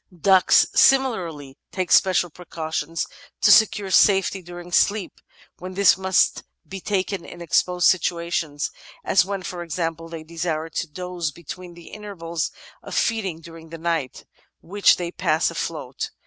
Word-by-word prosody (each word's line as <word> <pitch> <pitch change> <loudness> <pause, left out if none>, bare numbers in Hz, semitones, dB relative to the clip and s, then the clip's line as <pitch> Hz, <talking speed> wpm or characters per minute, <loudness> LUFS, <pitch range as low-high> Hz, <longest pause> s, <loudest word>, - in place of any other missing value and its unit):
Ducks 190 +2 +5
similarly 175 - +2
take 185 -2 -3
special 180 -3 +4
precautions 160 -1 -4 0.4
to 210 - +6
secure 205 -3 +4
safety 195 0 +4
during 175 0 -10
sleep, 205 +2 +1 0.4
when 185 +1 -8
this 200 0 +5
must 190 0 +2 0.3
be 195 - -7
taken 195 -2 -2
in 175 - -11
exposed 180 +1 +1
situations, 170 -4 0 0.3
as 185 - +3
when, 195 -1 -4
for 175 0 -6
ex 170 -1 -6
ample, 165 -1 -3
they 165 -1 -7
desire 165 -1 -3
to 170 - -3
doze 180 0 -4
between 175 +3 -10
the 170 -1 -13
intervals 170 -6 -5 0.3
of - - -8
feeding 195 -8 -1
during 165 0 -12
the 165 - -8
night, 165 -5 -3 0.4
which 200 +3 +3
they 175 -1 -4
pass 165 -2 0
afloat. 150 -6 -4
175 Hz, 145 wpm, -23 LUFS, 165-190 Hz, 0.4 s, to